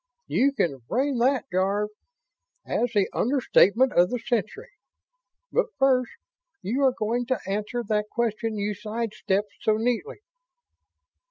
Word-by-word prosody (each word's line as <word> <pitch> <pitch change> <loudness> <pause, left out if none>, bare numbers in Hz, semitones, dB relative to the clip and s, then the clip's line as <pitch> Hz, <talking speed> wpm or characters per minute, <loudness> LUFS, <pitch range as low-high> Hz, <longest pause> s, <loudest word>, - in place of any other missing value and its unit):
"You 280 +2 +2
can 150 - -1
frame 265 0 0
that, 255 0 +2
Jarve, 195 +3 +1 0.8
as 245 -1 0
the 205 -3 +2
understatement 250 -1 +3
of 175 +1 +4
the 245 - -1
century. 240 - -3 0.8
But - - +2
first, 260 -2 +2 0.5
you 245 +8 -1
are 260 -2 +3
going 235 +3 -1
to 260 - 0
answer 210 +5 -2
that 210 0 0
question 225 -1 -1
you 205 +1 -1
sidestepped 210 -2 -2
so 215 -1 +2
neatly." 235 - -2
230 Hz, 125 wpm, -25 LUFS, 210-250 Hz, 0.8 s, of